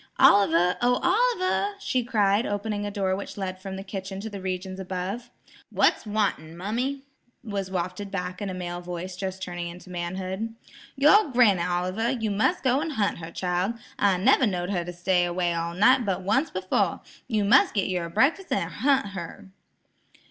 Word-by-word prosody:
Oliver 180 -3 +5
oh–Oliver!" 375 - +2
she 255 -9 0
cried, 215 -3 +2
opening 205 0 -2
a - - -2
door 195 -2 0
which 200 - -7
led 185 -1 -4
from 190 0 -6
the 195 - -6
kitchen 190 -1 -6
to 220 +1 -6
the 200 -1 -7
regions 185 0 -4
above. 190 +5 -4 0.4
"What's - - +2
wanting, 195 -6 -1
mummy?" 245 +9 -2 0.4
was 200 -3 -4
wafted 185 +2 -3
back 180 -1 -4
in 200 - -2
a - - -4
male 175 -1 -5
voice 180 +1 -6
just 190 0 -5
turning 175 -1 -4
into 180 +2 -10
manhood. 190 +5 -4 0.4
"Your 300 +7 +5
granny, 235 -8 +4
Oliver; 180 +6 -1
you 225 -5 -1
must 220 - +1
go 260 0 +3
hunt 215 - -1
her 165 0 -7
child. 180 +5 -1 0.2
I 195 -2 +3
never 250 +6 +4
knowed 180 -1 -2
her 175 -3 0
to 175 - -6
stay 175 +1 +1
away 175 0 0
all 170 0 -3
night 255 +7 +5
but 190 -3 -2
once 240 - +1
befo'. 185 0 0 0.3
You 215 -4 0
mus' 260 +7 +5
git 200 - 0
your 180 -2 -2
breakfas' 310 - +1
an' - - 0
hunt 270 -6 +1
her." 190 +1 -8
195 Hz, 175 wpm, -26 LUFS, 180-225 Hz, 0.4 s, Oliver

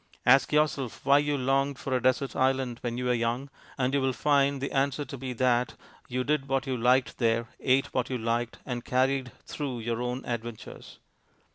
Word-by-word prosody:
Ask 135 +2 +5
yourself 150 -6 0
why 140 +1 +6
you 145 0 0
longed 135 +1 +1
for 135 -1 -2
a 125 - 0
desert 130 +2 +1
island 130 -2 +1
when 120 -1 -3
you 125 - -3
were 125 - +2
young, 120 +4 -1 0.3
and 130 0 0
you 140 - +2
will 130 0 +1
find 140 +2 +2
the 135 - -3
answer 140 +1 0
to - - -7
be 130 -1 -5
that 125 0 +1 0.3
you 125 0 -2
did 145 0 0
what 135 0 0
you 130 -2 -1
liked 125 +2 +2
there, 115 -1 +1
ate 130 +1 +1
what 125 -2 0
you 130 - -1
liked, 115 +1 -2
and 120 -2 -4
carried 130 0 +1
through 140 -5 -4
your 115 +1 -2
own 125 +1 -3
adventures. 120 -2 -6
130 Hz, 200 wpm, -28 LUFS, 120-135 Hz, 0.3 s, why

